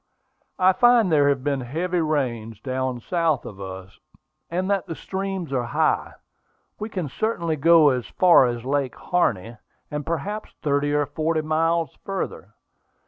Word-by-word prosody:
"I 185 0 +5
find 240 -4 +4
there 145 -2 +4
have 140 -2 0
been 140 -2 0
heavy 170 +8 -1
rains 120 -8 -2
down 130 0 -3
south 165 -2 0
of 100 -1 -9
us, 95 0 -9 0.5
and 180 +2 -1
that 200 -1 0
the 165 - -5
streams 190 -1 -4
are 130 - +1 0.2
high. - - +1 0.7
We 215 - -4
can 185 -7 -3
certainly 170 - -1
go 160 +1 +6
as 125 -3 -1
far 175 -8 +5
as 120 0 -4
Lake 140 -1 -1
Harney, 115 - -1 0.3
and 150 0 -3
perhaps 180 +8 -4
thirty 145 -1 +1
or 145 0 +2
forty 155 +2 -1
miles 160 0 0
farther. 195 -1 -5
155 Hz, 150 wpm, -23 LUFS, 130-175 Hz, 0.7 s, go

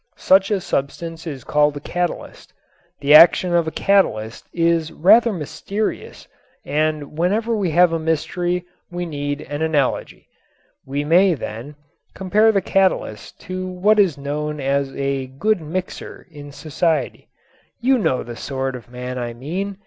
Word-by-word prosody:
Such 190 +1 +4
a 205 -2 +1
substance 165 +2 -4
is 140 -4 -6
called 150 -1 +2
a - - -5
catalyst. 175 +4 -4 0.5
The 140 +1 +4
action 175 +3 +7
of 170 -2 +2
a - - -2
catalyst 120 - 0
is 165 -1 +1
rather 225 +9 +5
mysterious 200 +5 -5 0.4
and 150 0 -1
whenever 220 +6 +1
we 200 -5 0
have 170 +1 +4
a 165 - 0
mystery 175 +3 -1 0.2
we 175 0 -4
need 145 -2 -4
an 145 +2 -6
analogy. 155 -4 -1 0.6
We 140 +2 -2
may, 175 +4 +4
then, 125 +3 -7 0.4
compare 205 +4 +3
the 200 -2 +1
catalyst 185 - 0
to 185 +1 -5
what 195 +4 +2
is 180 -8 +3
known 150 +2 -4
as 140 0 0
"a 135 -1 -2
good 180 +10 0
mixer" 180 +4 -6
in 145 -2 -10
society. 155 0 -2 0.5
You 255 +2 +2
know 130 - 0
the 120 0 -8
sort 135 +1 -4
of 120 -2 -11
man 125 +1 -6
I 120 -1 -4
mean. 185 +10 -4
160 Hz, 150 wpm, -20 LUFS, 140-185 Hz, 0.6 s, action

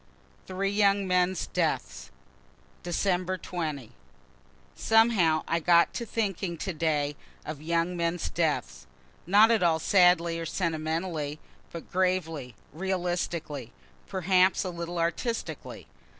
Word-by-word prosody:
THREE 195 +1 -1
YOUNG 200 -1 +2
MEN'S 180 0 +1
DEATHS - - -2 0.7
December 185 +1 -1
20. 155 -10 -5 0.8
Somehow 225 -9 +3
I 170 - +1
got 170 +1 +4
thinking 200 -6 -2
to 190 +3 -4
day 150 -2 0 0.3
of 155 -2 -6
young 170 +2 0
men's 170 0 -1
deaths - - -2 0.4
not 210 +5 +6
at 225 - +3
all 170 -2 +3
sadly 170 -1 +3
or 165 - -4
sentimentally, 160 -3 -2 0.3
but 170 - -9
gravely, 165 -9 -1 0.2
realistically, 175 - -3 0.3
perhaps 185 0 +2
a 185 - -3
little 170 0 -5
artistically. 170 +8 -3
175 Hz, 105 wpm, -28 LUFS, 160-190 Hz, 0.8 s, not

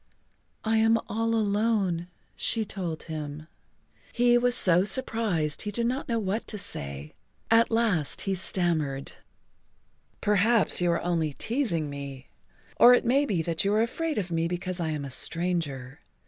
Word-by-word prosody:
"I 225 0 +1
am 225 +1 +4
all 225 +2 -1
alone," 205 -5 0 0.3
she 225 -2 0
told 175 -6 -5
him. 150 -1 -6 0.7
He 240 0 +3
was 245 0 +3
so 180 -5 +4
surprised 205 - 0
he 210 - -4
did 235 +3 -2
not 255 +3 -2
know 230 - +1
what 210 +1 -2
to 215 - -3
say. 70 - -5 0.4
At 230 +1 +5
last 220 - +1
he 195 - -1
stammered: 165 -7 0 1.1
"Perhaps 210 0 +2
you 175 - +2
are 170 - +1
only 165 -4 -1
teasing 220 - -1
me—or 140 - +1
it - - -1
may 275 +4 +2
be 180 -7 0
that 165 +3 -1
you 200 - +1
are 220 - +3
afraid 315 +6 -3
of 185 -4 -2
me 165 0 0
because 180 +1 -4
I 165 -2 -1
am 150 -2 -3
a 135 - -7
stranger. 145 -6 -2
190 Hz, 155 wpm, -27 LUFS, 160-225 Hz, 1.1 s, At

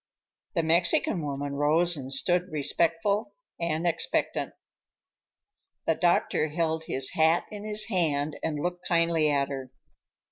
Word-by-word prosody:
The 165 - +1
Mexican 170 +1 +2
woman 140 -1 -4
rose 160 +5 +2
and 135 -2 -6
stood 175 +6 +1
respectful 170 - 0 0.2
and 170 0 -1
expectant. 165 -1 -1 1.3
The - - +3
doctor 175 -3 +1
held 160 0 -1
his 130 -3 0
hat 160 +2 +3
in 210 0 -7
his 215 0 0
hand 155 -7 0
and 155 -2 -2
looked 175 +3 -4
kindly 165 -2 +2
at 140 -1 +1
her. 135 -2 -6
165 Hz, 130 wpm, -27 LUFS, 145-175 Hz, 1.3 s, The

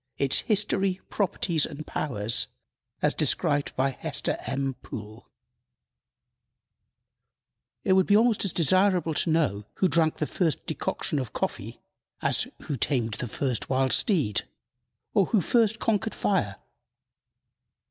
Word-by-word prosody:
Its 135 -1 +3
History, 195 -3 +1
Properties 180 -5 +1
and 155 0 -4
Powers, 115 -5 -1 0.6
as - - +4
described 145 0 +2
by 135 +1 +1
Hester - - -2
M. 135 0 -1
Poole. 110 0 -9 2.5
IT 190 - +3
would 190 -1 +3
be 205 - +5
almost 230 -1 +3
as 195 - +1
desirable 180 +1 +2
to 165 - 0
know 145 -11 +1
who 190 - +2
drank 165 -2 +2
the 150 - -2
first 160 -2 -1
decoction 150 - -2
of 125 -6 -5
coffee - - -3 0.4
as - - +1 0.2
"who 145 - -3
tamed 120 -3 0
the 125 - -3
first 125 +1 -2
wild 130 0 +1
steed," 150 - +2 0.7
or 200 -5 +3
"who 220 - +2
first 225 +4 +2
conquered 220 -1 -1
fire." 105 - 0
155 Hz, 125 wpm, -26 LUFS, 130-195 Hz, 2.5 s, be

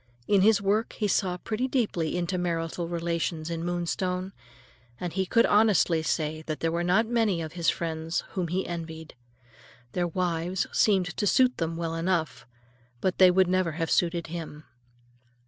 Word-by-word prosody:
In 200 -2 +4
his 210 +1 +5
work 210 +4 +1
he 210 - -1
saw 185 -2 0
pretty 225 +7 -2
deeply 205 - -1
into 180 +1 -1
marital 170 -1 -2
relations 170 -1 -2
in 165 0 -3
Moonstone, 180 +2 -2 0.7
and 175 -2 -4
he 190 0 -1
could 230 +4 +4
honestly 205 -6 +3
say 155 0 -1
that 155 -1 -3
there 165 - 0
were 170 +1 -1
not 185 +6 +3
many 220 -6 +1
of 160 -2 -5
his 170 -2 +1
friends 165 0 -2
whom 180 -3 -2
he 180 +3 -1
envied. 160 -2 -6 0.8
Their 175 -1 0
wives 175 +1 -1
seemed 185 -4 +2
to 205 - 0
suit 255 +4 +3
them 165 -1 -2
well 165 -1 -3
enough, 165 -5 -1 0.5
but 185 +4 -1
they 185 -1 +8
would 185 0 +4
never 185 -2 +1
have 165 0 -2
suited 170 -1 +1
him. 160 -2 -7
175 Hz, 165 wpm, -27 LUFS, 165-190 Hz, 0.8 s, they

